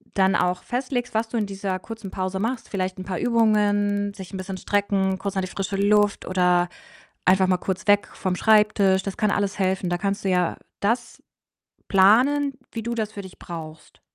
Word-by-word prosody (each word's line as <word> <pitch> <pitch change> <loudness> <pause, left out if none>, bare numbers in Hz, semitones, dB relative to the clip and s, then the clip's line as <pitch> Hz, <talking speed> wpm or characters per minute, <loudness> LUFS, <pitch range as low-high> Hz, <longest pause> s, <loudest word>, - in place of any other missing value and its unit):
dann 190 -1 +3
auch 180 0 +1
festlegst, 250 -1 -3
was 225 +1 +1
du 235 - -3
in 210 - 0
dieser 195 -1 -3
kurzen 225 -2 -8
Pause 190 0 -3
machst. 230 +3 -3
Vielleicht 185 -1 -3
'n 185 - -5
paar 185 -2 -3
Übungen, 205 -3 +2
sich 190 -2 -10
'n 190 - -4
bisschen 185 0 -5
strecken, 195 -2 0
kurz 200 +1 -4
an - - +2
die - - -3
frische 195 +1 -4
Luft 205 +1 +2
oder 180 -1 +2 0.6
einfach 190 0 +4
mal 185 - +3
kurz 190 +3 -4
weg 205 0 +4
vom 185 -4 -2
Schreibtisch. 210 -3 +3
Das 195 - -4
kann 210 -1 +1
alles 200 0 -1
helfen. 190 -1 0
Da 175 - 0
kannst 200 +2 -2
du 195 - +2
ja 180 -2 +1 0.2
das 235 +4 -1 0.6
planen, 255 +9 +4 0.2
wie 225 - -5
du 235 +1 -2
das 220 -1 -3
für 200 - -7
dich 190 - -13
brauchst. 160 -2 -9
200 Hz, 195 wpm, -24 LUFS, 185-215 Hz, 0.6 s, einfach